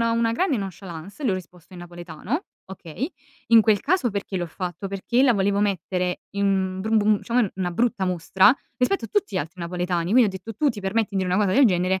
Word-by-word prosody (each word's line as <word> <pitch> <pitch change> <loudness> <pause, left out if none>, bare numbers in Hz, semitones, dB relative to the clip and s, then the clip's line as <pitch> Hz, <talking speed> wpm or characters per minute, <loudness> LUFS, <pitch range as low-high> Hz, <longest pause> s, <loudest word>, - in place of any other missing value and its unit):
una 230 0 +1
grande 295 +1 +1
nonchalance, 195 - -7
le 210 - +2
ho - - +1
risposto 180 -1 -10
in 175 - -9
napoletano, 175 - -5 0.2
okay? 190 - -6 0.4
In 230 -1 +8
quel 215 -2 +3
caso 285 - +1
perché 200 -1 -4
l'ho 175 - -2
fatto? 180 +3 -5
Perché 215 +6 0
la 250 -4 +5
volevo 200 +1 +1
mettere 180 -2 -1
in, 200 0 0
mhmm, 190 -1 0
bru 220 +2 +1
bum 210 -1 +3
diciamo, 240 -2 +2
una 180 -2 -1
brutta 230 +1 0
mostra, 185 +6 +4 0.2
rispetto 320 +11 +1
a - - -6
tutti 410 -2 -1
gli - - +1
altri 165 +4 -6
napoletani, 175 0 -2
quindi 250 -1 +6
ho - - -1
detto: 190 +4 -8
"Tu 295 +6 +2
ti 210 -3 -7
permetti 205 +2 0
di 200 - -4
dire 180 0 0
una - - +2
cosa 190 0 +1
del 275 -3 +6
genere, 185 0 +1
195 Hz, 225 wpm, -24 LUFS, 180-230 Hz, 0.4 s, In